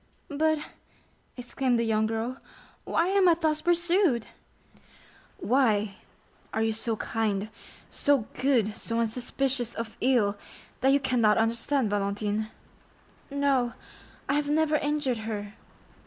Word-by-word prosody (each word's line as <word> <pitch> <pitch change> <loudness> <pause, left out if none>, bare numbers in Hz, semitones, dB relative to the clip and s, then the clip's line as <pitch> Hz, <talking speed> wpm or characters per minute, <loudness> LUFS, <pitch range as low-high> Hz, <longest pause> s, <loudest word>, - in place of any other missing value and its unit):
"But," 315 +2 +1 0.8
exclaimed 250 0 0
the 230 - +1
young 220 -1 +1
girl, 225 +3 -3 0.5
"why 335 +2 +1
am 385 -2 +4
I 335 - +5
thus 310 -2 0
pursued?" 345 - +2 1.1
"Why?—are 220 -2 -1
you 225 - +1
so 225 +1 -2
kind—so 220 +5 -2 0.2
good—so 230 -3 +1
unsuspicious 245 +2 -1
of 230 -1 -5
ill, 220 -6 +2 0.4
that 265 +2 +3
you 280 - +4
cannot 240 -6 +2
understand, 230 +2 +1
Valentine?" 205 +1 -1 0.8
"No, 275 -4 +1 0.5
I - - +1
have 290 0 0
never 310 0 +2
injured 290 -5 -1
her." 210 -2 -5
245 Hz, 110 wpm, -27 LUFS, 220-285 Hz, 1.1 s, I